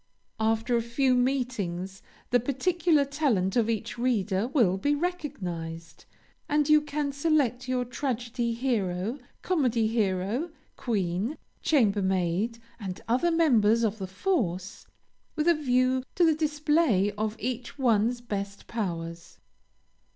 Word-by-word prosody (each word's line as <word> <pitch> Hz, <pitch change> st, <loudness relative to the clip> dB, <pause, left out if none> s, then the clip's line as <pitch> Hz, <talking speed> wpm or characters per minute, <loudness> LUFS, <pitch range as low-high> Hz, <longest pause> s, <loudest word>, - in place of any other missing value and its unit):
After 225 Hz, +2 st, +1 dB
a 235 Hz, -, +2 dB
few 255 Hz, +3 st, +1 dB
meetings, 240 Hz, -8 st, -1 dB, 0.3 s
the 245 Hz, -, +5 dB
peculiar 310 Hz, +4 st, +2 dB
talent 270 Hz, -10 st, 0 dB
of 230 Hz, -2 st, +2 dB
each 230 Hz, +1 st, -3 dB
reader 220 Hz, -4 st, +1 dB
will 235 Hz, -9 st, +3 dB
be 290 Hz, +9 st, +1 dB
recognized, 180 Hz, -, -5 dB, 0.4 s
and 295 Hz, 0 st, +2 dB
you 305 Hz, 0 st, +6 dB
can 295 Hz, -1 st, -2 dB
select 280 Hz, -4 st, +1 dB
your 250 Hz, -1 st, 0 dB
tragedy 240 Hz, -2 st, -2 dB
hero, 225 Hz, -2 st, -1 dB, 0.2 s
comedy 250 Hz, -11 st, +1 dB
hero, 215 Hz, -, 0 dB, 0.3 s
queen, 205 Hz, -, -1 dB, 0.2 s
chambermaid, 200 Hz, -, +1 dB, 0.2 s
and 190 Hz, -4 st, -5 dB
other 250 Hz, +9 st, +2 dB
members 235 Hz, -10 st, +4 dB
of 220 Hz, -1 st, 0 dB
the 190 Hz, -, -4 dB
force, 190 Hz, -, -2 dB, 0.5 s
with 305 Hz, +2 st, 0 dB
a 345 Hz, -, +7 dB
view 255 Hz, -3 st, +2 dB
to 350 Hz, -, +4 dB
the 320 Hz, -, +5 dB
display 300 Hz, -, +2 dB
of 215 Hz, +1 st, -3 dB
each 250 Hz, +3 st, -4 dB
one's 240 Hz, -2 st, +2 dB
best 200 Hz, -3 st, -5 dB
powers. 170 Hz, -6 st, -5 dB
235 Hz, 120 wpm, -27 LUFS, 200-280 Hz, 0.5 s, a